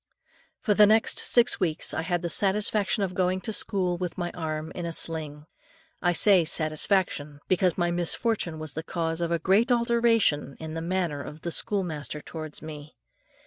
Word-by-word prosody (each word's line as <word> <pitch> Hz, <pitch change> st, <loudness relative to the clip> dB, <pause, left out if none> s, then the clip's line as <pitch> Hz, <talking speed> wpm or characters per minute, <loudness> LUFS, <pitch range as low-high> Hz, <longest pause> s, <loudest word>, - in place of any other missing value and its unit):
For 210 Hz, -, +2 dB
the 210 Hz, 0 st, +6 dB
next 220 Hz, +1 st, +4 dB
six 240 Hz, 0 st, +4 dB
weeks, 165 Hz, -4 st, +1 dB
I -, -, -1 dB
had 175 Hz, +1 st, -2 dB
the -, -, -1 dB
satisfaction 205 Hz, +3 st, +2 dB
of 185 Hz, -2 st, -3 dB
going 185 Hz, 0 st, 0 dB
to 220 Hz, -, -4 dB
school 180 Hz, -4 st, 0 dB
with 180 Hz, -2 st, -4 dB
my 175 Hz, -1 st, -3 dB
arm 155 Hz, -2 st, -5 dB
in 175 Hz, -, -6 dB
a 165 Hz, -, -4 dB
sling. 155 Hz, -3 st, -2 dB, 0.6 s
I 175 Hz, -, +2 dB
say 185 Hz, 0 st, +5 dB
satisfaction, 155 Hz, -1 st, 0 dB
because 185 Hz, -1 st, +1 dB
my 175 Hz, -1 st, 0 dB
misfortune 175 Hz, 0 st, -1 dB
was 155 Hz, -2 st, -7 dB
the 160 Hz, -, -4 dB
cause 165 Hz, 0 st, -3 dB
of 170 Hz, 0 st, -1 dB
a 170 Hz, -, +2 dB
great 195 Hz, -, +2 dB
alteration, 235 Hz, -, +2 dB
in 160 Hz, -1 st, -7 dB
the 165 Hz, -, -4 dB
manner 170 Hz, -4 st, -2 dB
of 150 Hz, +2 st, -10 dB
the 170 Hz, -, -4 dB
schoolmaster 160 Hz, -7 st, -2 dB
towards 155 Hz, 0 st, -8 dB
me. 150 Hz, -1 st, -9 dB
175 Hz, 180 wpm, -26 LUFS, 160-195 Hz, 0.6 s, the